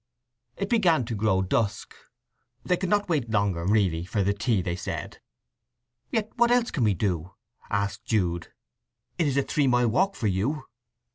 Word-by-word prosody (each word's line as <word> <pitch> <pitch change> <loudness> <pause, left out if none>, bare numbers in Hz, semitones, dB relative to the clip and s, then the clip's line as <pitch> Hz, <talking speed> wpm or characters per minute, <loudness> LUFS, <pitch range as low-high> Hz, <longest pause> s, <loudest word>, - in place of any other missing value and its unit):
It 200 - -2
began 180 - +3
to 115 - -4
grow 100 -2 +2
dusk. 100 +2 -1 0.7
They 180 - +2
could 185 0 -3
not 205 0 +2
wait 145 -9 0
longer, 100 -6 0
really, 95 -6 +2
for 100 +3 -1
the 100 +2 +2
tea, 105 -2 0
they 85 0 -2
said. 90 - -6 0.9
"Yet 220 -1 -1
what 240 - +4
else 245 -1 +2
can 135 - 0
we 105 -3 +2
do?" 90 -1 -2 0.3
asked 100 0 -2
Jude. 90 -6 0 0.7
"It 165 - +3
is 140 -1 0
a 140 - +3
three 145 0 +1
mile 125 -2 +3
walk 190 - +1
for - - -4
you." 105 +10 0
110 Hz, 170 wpm, -26 LUFS, 95-160 Hz, 0.9 s, what